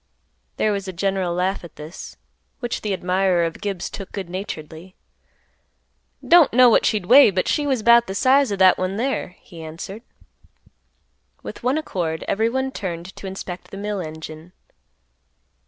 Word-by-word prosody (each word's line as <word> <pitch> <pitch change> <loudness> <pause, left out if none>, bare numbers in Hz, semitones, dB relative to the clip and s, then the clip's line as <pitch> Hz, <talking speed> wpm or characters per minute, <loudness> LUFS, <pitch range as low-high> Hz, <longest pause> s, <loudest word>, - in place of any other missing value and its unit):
There 215 - +2
was 200 -1 -3
a 190 - -5
general 190 0 -1
laugh 180 +3 -1
at 170 - -12
this, 155 +4 -10 0.4
which 240 -2 -3
the 210 - -3
admirer 185 -1 +1
of 165 - -5
Gibbs 200 -4 -3
took 195 -1 -8
good 190 -4 -6
naturedly; 180 -1 -7 1.3
"Don't 340 -4 +6
know 250 +1 +7
what - - +4
she'd 210 -5 0
weigh 265 +5 +8
but 185 -1 -1
she 295 -2 0
was 260 -6 0
'bout 235 +1 +6
the 190 - -5
size 265 +3 +3
o' - - 0
that 190 -1 +5
one 185 +1 -2
there," 240 -7 -2
he 170 -2 -12
answered. 170 +7 -8 1.4
With - - -8
one 255 +4 +1
accord 170 - -3
everyone 245 +5 0
turned 180 -4 -6
to 195 - -8
inspect 190 -1 -7
the 195 - -9
mill 205 0 -3
engine. 160 +1 -9
195 Hz, 160 wpm, -22 LUFS, 175-225 Hz, 1.4 s, weigh